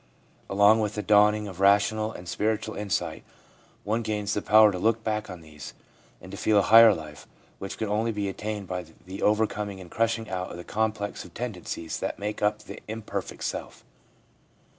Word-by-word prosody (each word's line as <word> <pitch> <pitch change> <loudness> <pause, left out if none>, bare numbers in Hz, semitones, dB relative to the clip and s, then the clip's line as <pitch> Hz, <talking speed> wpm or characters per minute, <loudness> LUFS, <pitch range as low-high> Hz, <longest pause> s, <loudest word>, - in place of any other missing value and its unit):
Along 100 +3 +5
with 105 -1 -1
the 105 - -3
dawning 105 0 +4
of 95 -2 -9
rational 105 +2 +3
and 90 -4 -10
spiritual 110 +3 -1
insight 90 -6 -3 0.6
one 110 +3 0
gains 105 -2 -2
the 105 - -1
power 110 0 +6
to 90 - -4
look 115 +3 +1
back 110 -2 -2
on 90 -2 -8
these, 75 -2 -11 0.4
and 95 - -12
to 100 - -7
feel 105 0 +3
a 100 - +5
higher 115 +2 +8
life, 75 -2 -10 0.3
which 95 - -6
can 110 - -2
only 110 +3 0
be 105 -2 -2
attained 105 0 -5
by 90 0 -4 0.2
the 95 +2 -8
overcoming 105 -2 0
and 90 -2 -12
crushing 115 0 0
out 90 -1 -4
of - - -8
the 85 - -8
complex 110 -1 -2
of 85 - -15
tend 125 -1 -3
encies 85 -2 -6
that - - -3
make 105 +1 -4
up 105 0 0
the - - -9
imperfect 105 -3 -5
self. - - -5
105 Hz, 190 wpm, -26 LUFS, 95-110 Hz, 0.6 s, higher